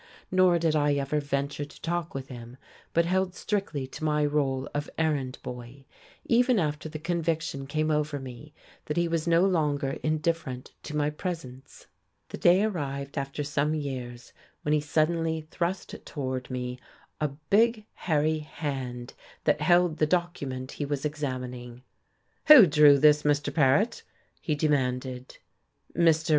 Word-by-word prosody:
Nor 185 -2 +4
did 165 -2 +1
I 145 -1 +2
ever 140 +2 0
venture 140 0 -2
to 145 - -12
talk 170 -2 -3
with 135 -1 -5
him, 120 0 -10 0.3
but 170 0 +2
held 185 +1 0
strictly 195 -10 -2
to 130 - -10
my 150 -1 +2
role 140 -2 0
of 145 0 -3
errand 145 -5 0
boy, 125 +2 -9 0.4
even 245 +1 +3
after 155 -3 -1
the 155 - -6
conviction 165 -3 -2
came 155 +2 0
over 150 -1 0
me 130 +3 -10 0.3
that 150 - -3
he 170 0 +2
was 165 -1 -1
no 170 +2 +4
longer 150 -7 0
indifferent 155 -4 -2
to 150 - -6
my 150 0 +1
presence. 150 -6 -7 0.4
The - - -7
day 180 +3 +5
arrived, 140 -9 -3
after 140 0 -3
some 145 +1 0
years, 125 -5 -6 0.3
when 150 - +1
he 150 - +3
suddenly 160 +2 0
thrust 180 +2 -3
toward 130 -3 -4
me 125 -1 -4 0.4
a 150 - +1
big, 205 - +1
hairy 155 -1 0
hand 135 -5 -5 0.3
that 150 - +2
held 175 0 +3
the 155 - +2
document 145 -7 -2
he - - -5
was 140 0 -3
examining. 125 -4 -5 0.6
"Who 300 -9 +11
drew 150 -3 +6
this, 150 +1 +5
Mr. 145 -1 0
Paret!" 155 - +3 0.4
he 155 - -1
demanded. 130 -4 -1 0.6
Mr. 165 -1 +3
150 Hz, 150 wpm, -27 LUFS, 135-165 Hz, 0.6 s, Who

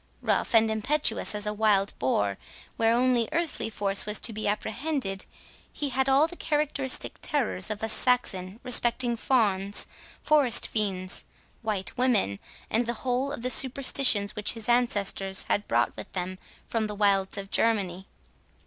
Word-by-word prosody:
Rough - - 0
and 220 0 +4
impetuous 230 0 +1
as 210 0 +1
a 210 - -1
wild 210 -2 +2
boar, 100 -6 0 0.4
where 225 0 +2
only 245 -2 +1
earthly 330 -8 -2
force 200 -2 0
was 210 0 +1
to 230 - +2
be 215 0 -3
apprehended, 220 0 -3 0.4
he 290 - -3
had 265 +1 0
all 275 +3 +5
the 355 - -8
characteristic 295 -5 -1
terrors 240 -9 0
of 215 0 -4
a - - 0
Saxon 215 -5 0
respecting 245 -1 +2
fawns, 205 -6 +1 0.3
forest 290 -6 +3
fiends, 195 -3 -1 0.4
white 210 -4 -3
women, 215 - +1 0.3
and 230 +2 0
the 235 - -1
whole 255 +2 0
of 260 -5 -7
the 255 - +1
superstitions 255 -6 +3
which 210 - +2
his 225 -2 -6
ancestors 205 -5 +1
had 205 - 0
brought 120 +1 +1
with - - -9
them 185 0 -4 0.3
from 225 -2 -2
the 210 - -6
wilds 200 -1 +1
of 195 0 -6
Germany. 195 -5 0
220 Hz, 155 wpm, -27 LUFS, 200-255 Hz, 0.4 s, all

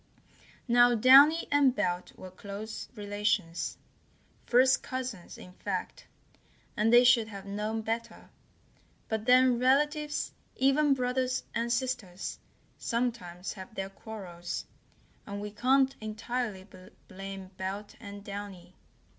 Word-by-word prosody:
Now 240 0 +5
Downy 275 +8 +7
and 280 -3 +4
Belt 180 -5 -2
were 185 - -10
close 200 +3 -7
relations, 205 -5 -1 0.7
first 260 +2 +4
cousins, 255 -8 -6
in 180 - -12
fact, - - -5 0.7
and 225 0 +2
they 240 +1 +8
should 240 -3 +5
have 200 -3 -9
known 210 +2 -3
better; 230 +1 -5 0.8
but 220 +1 -2
then 250 -1 +5
relatives, 295 +4 +1 0.2
even 275 +2 +3
brothers 255 0 -1
and 235 +1 -1
sisters, 235 -7 -3 0.4
sometimes 230 -7 -3
have 195 +4 -11
their 195 0 -4
quarrels, 185 -5 -7 0.6
and 200 -1 -5
we 210 0 -5
can't 265 +5 +3
entirely 215 -2 -4 0.4
blame 195 0 -8
Belt 195 +2 -5
and 200 -2 -9
Downy. 200 -3 -8
220 Hz, 115 wpm, -30 LUFS, 200-255 Hz, 0.8 s, they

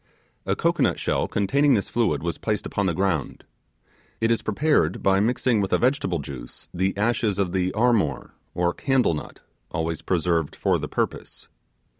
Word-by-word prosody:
A - - +1
cocoanut - - +1
shell - - 0
containing 140 +8 +2
this 100 - -1
fluid 110 -12 0
was 85 -1 -3
placed 105 -1 -2
upon 100 -1 -1
the 85 - 0
ground. 90 -6 -1 0.8
It 115 0 +2
is 115 - +1
prepared 110 - +1
by 95 0 +4
mixing 120 +1 +1
with 95 - -2
a - - +4
vegetable 125 - +1
juice 70 -5 -9
the 95 +2 -1
ashes 105 -1 +1
of 95 -3 0
the 95 0 0
'armor', 110 - +1 0.2
or 85 0 +1
candle 135 -9 +1
nut, 75 - -7 0.3
always 80 0 -3
preserved 85 -3 0
for - - +1
the - - -4
purpose. - - -4
95 Hz, 165 wpm, -24 LUFS, 85-115 Hz, 0.8 s, by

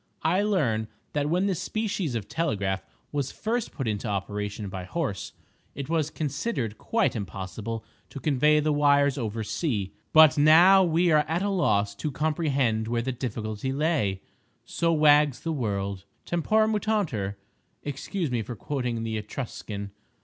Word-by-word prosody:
I 180 +5 +3
learn 140 - +1 0.3
that 145 0 0
when 180 +4 +2
this 190 -4 -1
species 200 - -2
of 110 -3 -3
telegraph 100 - -1 0.3
was 140 -3 -2
first 230 +1 -2
put 135 -5 -4
into 105 +1 -2
operation 105 +1 -3
by 95 -1 -5
Horse, 130 - -3 0.4
it 140 0 -5
was 160 -2 +1
considered 145 - -3
quite 225 - +1
impossible 105 +2 -5 0.2
to 140 - -8
convey 150 +1 +3
the 150 0 +1
wires 140 -1 +3
over 110 -1 -3
sea, 105 - -2 0.2
but 155 -3 +7
now 175 +6 +7
we 170 0 +2
are 150 -1 +5
at 170 +4 0
a 205 - 0
loss 105 - +1
to 150 - -3
comprehend 140 -7 0
where 115 0 0
the 130 - -1
difficulty 115 -1 -4
lay! 135 - 0 0.4
So 165 0 0
wags 150 -3 +4
the 165 - -2
world. 100 -7 -2 0.2
Tempora 215 +6 +2
mutantur—excuse 145 - -3
me 120 -2 0
for 115 +3 -6
quoting 125 -3 -3
the 110 -1 -2
Etruscan. 105 -3 -6
140 Hz, 150 wpm, -27 LUFS, 110-160 Hz, 0.4 s, but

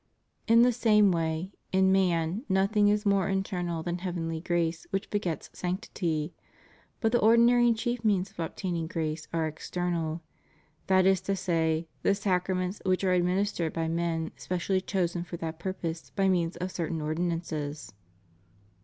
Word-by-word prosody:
^ - - -47 0.5
In 230 +1 +7
the 250 - +5
same 210 -4 +4
way, 165 +2 -1 0.2
in 190 0 +4
man, 180 +1 +1
nothing 200 +2 +3
is 210 +1 +2
more 200 -2 +2
internal 180 -4 -2
than 175 +1 -3
heavenly 170 -3 -3
grace 170 -2 -1
which 195 0 -3
begets 180 -7 -2
sanctity, 175 -4 -2 0.7
but 225 -2 +1
the 240 - +3
ordinary 235 +2 +5
and 230 -1 +3
chief 240 +1 -2
means 200 -2 +1
of 195 - -20
obtaining 170 0 -3
grace 160 -2 -3
are 165 -1 0
ex 155 0 -6
ternal: 170 -2 -2 0.7
that 185 -1 +4
is 190 -1 +4
to 195 - -1
say, 165 -3 0
the 200 - +3
sacraments 185 -1 -1
which 185 0 +1
are 185 -1 +3
adminis 185 +3 +1
tered 165 -2 -2
by 165 -1 -1
men 165 -1 -1
specially 185 +1 -1
chosen 175 -3 -1
for 175 0 -7
that 160 -1 -5
purpose, 170 -2 -4
by 195 -1 +2
means 175 -2 +1
of 180 +2 -3
certain 165 -2 -3
ordinances. 155 -3 -3
180 Hz, 160 wpm, -28 LUFS, 165-195 Hz, 0.7 s, In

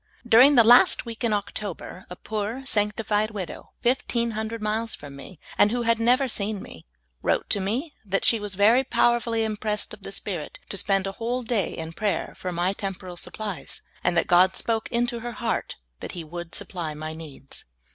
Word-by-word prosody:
During 255 +5 +8
the 235 - +8
last 240 +3 +7
week 230 +1 -7
in 230 - +2
October, 200 -3 -4
a 180 - -7
poor, 220 +7 -4
sanctified 210 -2 +1
widow 200 -5 -6
fifteen 235 -1 +1
hundred 220 +1 -3
miles 220 +1 -1
from 145 -1 -11
me, 150 +4 -11 0.2
and 205 - +7
who 240 +2 -1
had 230 -1 +2
never 250 +4 +4
seen 210 -3 -2
me, 80 - -11 0.4
wTote - - +1
to 205 - +2
me 240 - -2
that 195 -1 0
she 230 - +5
was 205 -2 -4
very 220 +7 +5
power 240 -2 +3
full}' 230 -1 -3
im 220 -1 0
pressed 210 -1 -2
of - - -11
the - - -8
Spirit - - -5
to - - -4
spend 195 -1 +1
a 195 - -2
whole 245 +2 -1
day 225 -4 -1
in 165 0 -5
prayer^ 205 +3 -1
for - - -8
m}' 180 +1 0
temporal 190 -2 -5
supplies, 205 +1 -5 0.2
and 175 - +2
that 165 - +4
God 180 +2 +5
spoke 225 -1 -1
into 240 0 0
her 240 +1 -5
heart 230 -2 -2 0.2
that - - -7
He 175 - -5
would 170 +2 -7
supply 165 -5 -4
my 155 +1 -5
needs. 150 -4 -10
210 Hz, 195 wpm, -25 LUFS, 185-230 Hz, 0.4 s, During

